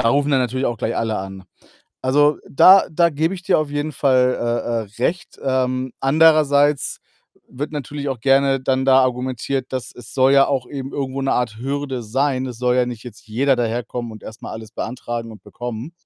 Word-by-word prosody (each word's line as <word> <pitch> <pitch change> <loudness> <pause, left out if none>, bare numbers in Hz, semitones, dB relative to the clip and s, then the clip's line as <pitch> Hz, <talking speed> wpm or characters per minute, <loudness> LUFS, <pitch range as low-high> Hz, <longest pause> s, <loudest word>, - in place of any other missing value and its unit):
da 115 - +2
rufen 145 +3 +2
dann 130 - +3
natürlich 130 +2 -1
auch 115 -3 -3
gleich 115 - -2
alle 110 -2 -1
an. 95 0 -8 0.6
Also, 145 +3 +3
da 190 +7 +7
da 170 +1 +3
gebe 160 +5 -1
ich 180 - -9
dir 185 - +2
auf 155 -1 -1
jeden 145 +1 -2
Fall, 130 -2 +3
äh, 115 -2 -3
äh, - - +3
recht. 175 +1 -2
Ähm, 130 -1 -1
andererseits 145 -1 +3 0.5
wird 145 +4 -5
natürlich 145 0 -5
auch 130 -4 -4
gerne 135 0 +3
dann 130 0 0
da 135 0 +6
argumentiert, 130 +1 -2
dass 130 -2 -4
es 125 0 -11
soll 130 +1 +4
ja 140 0 +6
auch 130 -3 -2
eben 135 -1 -6
irgendwo 135 -1 -3
'ne 135 - +1
Art 115 -3 -1
Hürde 135 0 -3
sein. 130 +3 -1
Es 125 -3 -7
soll 125 0 +1
ja 125 - +2
nicht 120 -2 -6
jetzt 120 -2 -12
jeder 130 +5 +1
daherkommen 120 0 -3
und 110 - -12
erst 110 +1 -10
mal - - -6
alles 110 -1 -9
beantragen 120 -1 -5
und 105 - -14
bekommen, 120 +5 -7
130 Hz, 200 wpm, -20 LUFS, 120-140 Hz, 0.6 s, da